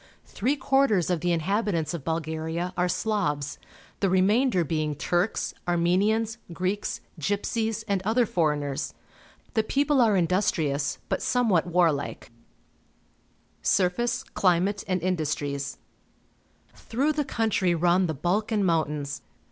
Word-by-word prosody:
Three 255 +8 -1
quarters 260 - +2
of 175 - +1
the 175 +2 0
inhabitants 170 -1 0
of 165 -5 -5
Bulgaria 160 +2 -3
are 180 0 +1
Slavs, 180 -8 -1 0.4
the 195 - +2
remainder 190 +2 +3
being 155 -1 -1
Turks, 175 +7 0
Armenians, 205 +7 +1
Greeks, 185 +4 -2 0.2
Gypsies, 220 - -1
and 200 -3 0
other 225 +5 +2
foreigners. 150 -6 -1 0.6
The 225 - +3
people 280 +4 +2
are 215 -4 +4
industrious, 160 -5 +1
but - - -1
somewhat 220 -10 +2
war 175 -1 +4
like. 140 -4 -5 1.3
Surface, 235 +7 +1
Climate, 190 +1 +1
and 185 -3 -1
Industries. 145 -5 -2 0.5
— - - -37 0.2
Through 275 +7 +1
the 295 0 0
country 215 -8 +1
run 175 +2 +3
the 160 - -2
Balkan 205 - 0
Mountains. 150 -4 -1
180 Hz, 120 wpm, -26 LUFS, 160-220 Hz, 1.3 s, are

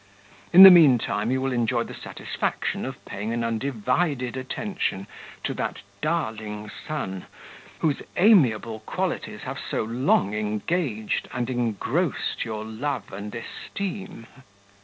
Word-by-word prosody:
In 185 +2 +11
the 190 - +13
mean 155 -8 +8
time, 105 0 -2
you 130 +1 +1
will 135 0 -1
enjoy 120 -1 +1
the - - -9
satisfaction - - -3
of - - -8
paying 105 +3 -4
an 120 0 -1
undivided 125 +3 -1
attention 130 - -3 0.4
to - - -1
that - - -3 0.2
darling 110 -10 -2 0.2
son, 95 - -4 0.5
whose 150 -4 +1 0.2
amiable 120 - +4
qualities 110 - -3
have - - -5
so - - -2
long 115 -3 +1
engaged 110 - -1
and 125 0 -2
engrossed 125 - -1
your 110 -1 -5
love 115 +1 -4
and 100 +2 -6
esteem." 190 - -6
120 Hz, 125 wpm, -25 LUFS, 110-150 Hz, 0.5 s, the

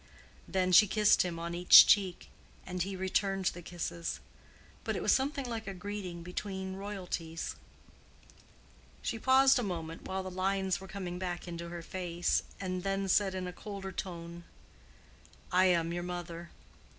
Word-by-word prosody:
Then 185 -1 0
she 210 +4 +8
kissed 210 +1 +4
him 175 -2 -2
on 170 +1 -4
each 175 +1 +9
cheek, 190 -4 +2 0.3
and 180 -1 -4
he 195 +2 -2
returned 190 +1 0
the 175 - -1
kisses. 170 0 -4 0.6
But - - -2
it - - -3
was - - +3
something 275 +1 +1
like 225 -2 -5
a 195 - -4
greeting 185 -3 -6
between 190 +1 -5
royalties. 180 -5 -5 1.5
She 225 - -2
paused 265 +2 +5
a - - +1
moment 165 -6 -5
while 190 0 -3
the 185 - -6
lines 190 -1 0
were 190 - -9
coming 185 -2 -5
back 180 -1 -4
into 170 0 -6
her 170 -1 -7
face, 175 -1 -1 0.2
and 185 -1 -3
then 195 +1 -1
said 190 0 +3
in 185 -1 -3
a 180 - -5
colder 195 0 -7
tone, 170 -2 -6 1.1
"I 185 +1 +5
am 170 -2 +2
your 175 - -2
mother. 175 -1 -6
185 Hz, 160 wpm, -32 LUFS, 175-195 Hz, 1.5 s, each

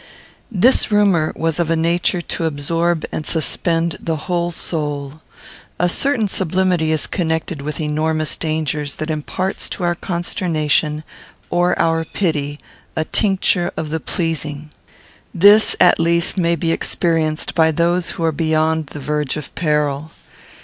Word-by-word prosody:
This 230 +4 +3
rumour 195 -7 +3
was 165 0 -1
of 170 -2 0
a 165 - +2
nature 170 +2 +1
to 165 - -3
absorb 165 +3 -1
and - - -3
suspend 165 +1 0
the 165 - -2
whole 175 +2 -2
soul. 150 -3 -4 0.6
A 175 - +2
certain 235 +4 +1
sublimity 185 -3 +1
is 155 -2 +1
connected 160 -3 -2
with 150 +2 -4
enormous 155 0 0
dangers 155 -2 -2
that 155 +1 -3
imparts 180 +5 -3
to 185 - -5
our 175 0 +2
consternation 160 -4 -1 0.5
or 175 +1 +2
our 165 0 +1
pity 150 -5 -2 0.4
a 160 - -1
tincture 190 -3 +1
of 155 -1 -3
the 160 - -1
pleasing. 155 -3 -3 0.6
This, 205 +5 +6
at 180 - +5
least, 170 +1 +4
may 170 -3 +2
be 165 -1 -1
experienced 165 -2 0
by 160 -1 +4
those 170 +2 +1
who 165 - -2
are 165 - +2
beyond 160 0 0
the 145 - -8
verge 150 0 -2
of 150 - -8
peril. 150 -2 0
165 Hz, 140 wpm, -19 LUFS, 155-175 Hz, 0.6 s, This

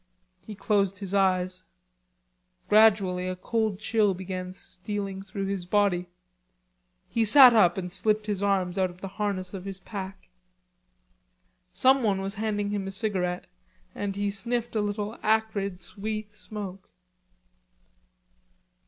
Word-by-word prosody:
He 215 - -7
closed 200 -1 +1
his 195 0 -6
eyes. 185 -2 +1 1.1
Gradually 200 -4 +4
a 185 - -2
cold 215 +1 -1
chill 215 -3 +2
began 185 0 -5
stealing 195 +1 -5
through 195 0 -5
his 195 -2 -3
body. 185 -3 +2 1.0
He 225 +5 +1
sat 250 +3 +9
up 180 -6 +5
and 180 -1 -4
slipped 215 +2 0
his 205 -2 -2
arms 195 -2 +1
out 185 -1 +2
of 180 +1 -15
the 195 - -4
harness 195 -2 -3
of 190 -2 -6
his 195 -1 -5
pack. 190 0 -8 1.4
Someone 220 0 +3
was 195 +1 -3
handing 205 -2 -1
him 200 -2 -2
a - - -4
cigarette, 190 -4 -2 0.5
and 200 -1 -3
he 200 0 -1
sniffed 235 +3 -2
a 215 - +2
little 205 +2 -3
acrid 210 -4 0
sweet 215 +1 -5
smoke. 200 -3 -8
200 Hz, 130 wpm, -27 LUFS, 185-215 Hz, 1.4 s, sat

